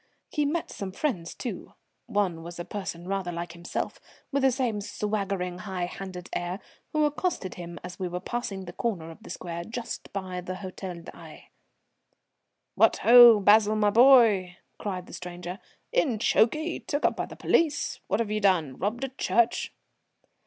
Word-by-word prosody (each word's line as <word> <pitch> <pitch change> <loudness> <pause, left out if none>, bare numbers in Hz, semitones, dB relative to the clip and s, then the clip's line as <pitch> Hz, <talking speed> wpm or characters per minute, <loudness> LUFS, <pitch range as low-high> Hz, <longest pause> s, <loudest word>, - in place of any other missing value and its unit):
He 300 -2 +1
met 320 +3 -1
some 195 -2 -5
friends, 185 - -2
too, 230 -8 -6 0.3
one 185 -5 0
was 170 +1 -8
a 175 - -5
person 180 -4 -6
rather 195 -2 -2
like 170 0 -5
himself, 170 0 -4 0.3
with 280 0 +1
the 265 0 +5
same 240 -5 -1
swaggering 195 -4 -2
high 185 -3 -3
handed 185 0 -7
air, 175 +2 -2 0.3
who 305 -1 +2
accosted 295 - -1
him 175 -1 -8
as 180 +2 -8
we 185 - -1
were 180 0 -4
passing 195 -2 -4
the 175 - -8
corner 175 -7 -3
of 165 - -14
the - - -12
square 170 0 -5
just 230 +5 -6
by 185 -2 -4
the 180 +1 -5
Hôtel 185 -2 -7
d'Aix. - - -12 1.2
"What - - +4
ho! 240 -2 +10
Basil 210 +1 +5
my 210 -1 +3
boy!" 225 -7 +6 0.2
cried 185 -3 -4
the - - -13
stranger. 180 +1 -7 0.3
"In 310 - +2
chokey? 305 +10 +2
Took 290 0 -2
up - - +3
by - - -3
the - - -10
police? 310 -4 +1
What've 210 +2 0
you 215 - 0
done? 170 -9 +2
Robbed 220 +7 -2
a 270 - -1
church?" 235 -2 +1
195 Hz, 165 wpm, -27 LUFS, 180-235 Hz, 1.2 s, ho